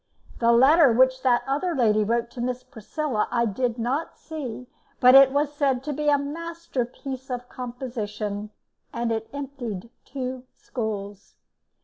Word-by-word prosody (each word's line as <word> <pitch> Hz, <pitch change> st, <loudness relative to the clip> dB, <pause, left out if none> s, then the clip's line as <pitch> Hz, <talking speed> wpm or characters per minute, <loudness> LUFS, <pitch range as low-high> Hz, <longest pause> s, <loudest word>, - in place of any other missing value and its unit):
The 235 Hz, 0 st, +4 dB
letter 270 Hz, +4 st, +6 dB
which 260 Hz, +2 st, +4 dB
that 245 Hz, -2 st, +3 dB
other 295 Hz, +6 st, -1 dB
lady 215 Hz, -4 st, +3 dB
wrote 235 Hz, +2 st, 0 dB
to 245 Hz, -, -6 dB
Miss 250 Hz, +1 st, -2 dB
Priscilla 255 Hz, 0 st, -3 dB
I 235 Hz, -1 st, +1 dB
did 235 Hz, +3 st, -1 dB
not 255 Hz, +7 st, -2 dB
see, 260 Hz, -7 st, -6 dB, 0.3 s
but 250 Hz, 0 st, +7 dB
it 270 Hz, 0 st, +9 dB
was 290 Hz, +1 st, 0 dB
said 275 Hz, -4 st, +1 dB
to 295 Hz, +1 st, -3 dB
be 300 Hz, +1 st, 0 dB
a 290 Hz, -, +5 dB
masterpiece 280 Hz, -4 st, -5 dB
of 245 Hz, -1 st, -4 dB
composition, 215 Hz, -5 st, -5 dB, 0.4 s
and 235 Hz, 0 st, -2 dB
it 220 Hz, 0 st, -2 dB
emptied 250 Hz, -7 st, -6 dB
two 255 Hz, -1 st, -5 dB
schools. 205 Hz, -4 st, -5 dB
250 Hz, 145 wpm, -25 LUFS, 230-280 Hz, 0.4 s, it